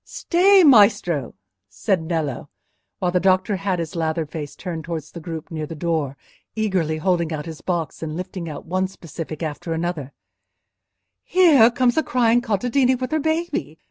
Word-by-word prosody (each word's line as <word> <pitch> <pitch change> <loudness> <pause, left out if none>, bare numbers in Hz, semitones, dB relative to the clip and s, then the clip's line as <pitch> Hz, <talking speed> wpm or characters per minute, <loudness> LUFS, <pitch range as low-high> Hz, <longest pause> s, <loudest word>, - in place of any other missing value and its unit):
"Stay, 380 +2 +4
Maestro," 205 - +4 0.3
said 100 - 0
Nello, 160 -5 -3 0.5
while 180 -1 0
the 180 - +2
doctor 190 +2 +2
had 190 -1 -1
his 165 -1 -5
lathered 160 -2 -2
face 145 -3 -6
turned 170 -4 -5
towards 160 -2 -5
the 170 - -8
group 165 +1 -7
near 155 -2 -4
the 165 - -7
door, 155 -4 -2 0.4
eagerly 185 -8 0
holding 170 -1 0
out 150 -2 -4
his 160 -3 -8
box, 170 -4 -3
and 160 0 -4
lifting 180 -2 -5
out 150 - -8
one 185 +2 0
specific 165 -3 -8
after 160 +2 -4
another; 160 -4 -3 1.1
"here 320 -11 +5
comes 245 +1 +1
a - - +5
crying 240 -4 +2
contadina 245 +4 +1
with 255 0 -4
her 315 - +1
baby. 320 +3 -2
175 Hz, 165 wpm, -22 LUFS, 160-225 Hz, 1.1 s, here